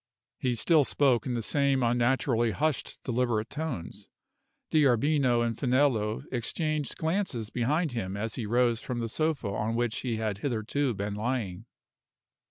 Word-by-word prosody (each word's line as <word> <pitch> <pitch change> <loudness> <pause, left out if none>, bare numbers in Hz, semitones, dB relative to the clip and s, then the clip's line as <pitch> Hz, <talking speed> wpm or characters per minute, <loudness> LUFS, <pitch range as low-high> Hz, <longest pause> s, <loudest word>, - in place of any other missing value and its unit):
He 125 -2 0
still 155 +6 +4
spoke 130 -4 +2
in 125 - -1
the 115 - -2
same 140 0 +2
unnaturally 120 0 +2
hushed, 150 +4 -1
deliberate 120 -3 0
tones. 150 - -5 0.6
D'Arbino 140 -3 +3
and 115 -1 -1
Finello 125 -4 +1
exchanged 150 +4 -1
glances 160 - -1
behind 150 +7 0
him 100 -5 -3
as 110 +1 -3
he 115 -4 -3
rose 120 0 +2
from 125 - -4
the 115 -1 -2
sofa 155 -1 -1
on 105 +3 -1
which 120 -2 0
he 120 -3 -2
had 110 -3 -2
hitherto 125 +2 -1
been 100 +1 -3
lying. 105 -3 -3
120 Hz, 145 wpm, -28 LUFS, 110-140 Hz, 0.6 s, still